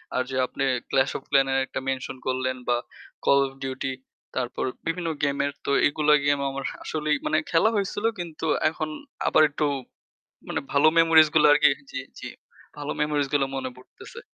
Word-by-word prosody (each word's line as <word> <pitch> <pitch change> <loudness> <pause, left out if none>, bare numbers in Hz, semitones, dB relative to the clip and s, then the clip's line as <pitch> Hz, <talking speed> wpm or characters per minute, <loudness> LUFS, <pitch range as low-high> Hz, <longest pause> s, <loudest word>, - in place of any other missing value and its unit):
আর 130 - +2
যে 130 - -4
আপনি 135 - -4 0.3
Clash 130 0 +2
of 135 - -12
Clan 135 -1 +4
এর 135 - +2
একটা - - -5
মেনশন 130 0 -3
করলেন 130 0 -1
বা 120 - +3 0.5
Call 140 - +5
of 135 - -11
Duty 130 0 -3 0.4
তারপর 125 -1 -2 0.2
বিভিন্ন 165 0 -2
গেমের 140 0 +1
তো - - -2 0.2
এগুলা 150 +1 +2
গেম 145 0 +2
আমার 135 0 -5 0.2
আসলেই 150 -1 -1
মানে 155 - +2
খেলা 165 +6 +4
হয়েছিল 205 +1 -2
কিন্তু 165 -2 -5 0.2
এখন 155 -1 -4 0.4
আবার - - +5
একটু 150 +1 -1 0.8
মানে - - -2
ভালো 145 +2 +5
মেমোরিজ 165 -1 +7
গুলো 150 -1 +6
আরকি 150 0 +6 0.2
জী, 135 - -4 0.2
জী - - -7 0.5
ভালো 145 0 -3
মেমোরিজ 150 -1 +1
গুলা 140 -2 +2
মনে 130 -1 -3
পড়তেছে। 125 - -13
145 Hz, 170 wpm, -25 LUFS, 135-155 Hz, 0.8 s, মেমোরিজ